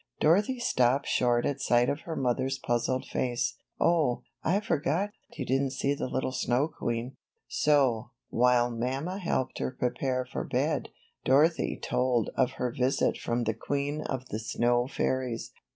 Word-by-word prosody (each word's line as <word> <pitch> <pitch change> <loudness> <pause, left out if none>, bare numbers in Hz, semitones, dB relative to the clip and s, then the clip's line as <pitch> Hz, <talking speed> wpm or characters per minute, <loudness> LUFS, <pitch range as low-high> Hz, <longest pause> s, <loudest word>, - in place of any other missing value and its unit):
Dorothy 200 +11 +3
stopped 130 - +2
short 120 -1 +2
at 145 -1 -1
sight 120 0 +3
of 145 - 0
her 165 - -4
mother's 130 +1 0
puzzled 120 0 -1
face. 120 -1 -1 0.2
^Dh, 160 -8 +2 0.2
I 185 +5 +2
forgot, 175 +2 0 0.3
you 135 - -3
didn't 135 +1 +1
see 140 +1 0
the 140 - -3
little 130 0 -1
snow 130 +2 +1
queen." 120 -2 -3 0.3
So, 130 -6 +2 0.2
while 120 0 +3
mamma 135 - -2
helped 170 -8 -1
her - - -1
prepare 130 0 -1
for 125 - -4
bed, - - -1 0.3
Dorothy 150 +5 +3
told 125 -3 +1
of 130 -1 +2
her 125 -2 -2
visit 130 +2 +2
from 120 +1 -1
the 110 -1 0
queen 145 +6 -2
of 130 -3 -4
the 110 - -3
snow 120 +2 +1
fairies. 130 -3 -2
130 Hz, 150 wpm, -29 LUFS, 120-145 Hz, 0.3 s, Dorothy